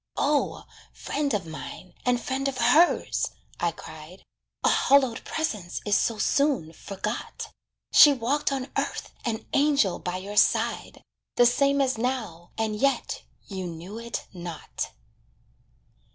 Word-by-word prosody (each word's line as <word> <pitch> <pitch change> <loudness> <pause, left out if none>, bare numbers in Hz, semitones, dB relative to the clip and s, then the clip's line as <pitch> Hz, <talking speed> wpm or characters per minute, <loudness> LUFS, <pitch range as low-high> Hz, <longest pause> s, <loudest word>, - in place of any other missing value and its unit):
"O, 290 -1 +1 0.3
friend 285 -1 -2
of 205 -6 -1
mine, 160 +3 -8
and 245 -1 +3
friend 265 +2 -2
of 270 -1 -3
hers," 320 +8 +3 0.3
I - - +2
cried, - - -11 0.4
"A - - +5
hallowed 265 -4 +3
presence 210 - -3
is 205 -1 +3
so 225 +2 +1
soon 265 - +1
forgot. 205 +6 -5 0.4
She 295 - +10
walked 275 +3 0
on 270 -1 -3
earth - - -2
an 225 -2 -2
angel 280 -9 +3
by 180 0 -3
your 200 +3 -7
side, - - +2 0.3
The 245 - +6
same 280 +3 +3
as 260 -4 +1
now, 225 -9 -3
and 220 -1 -1
yet 275 +6 0 0.2
you 190 -3 -5
knew 175 +6 -7
it 235 0 -5
not." 170 -3 -5
235 Hz, 135 wpm, -26 LUFS, 190-275 Hz, 0.4 s, She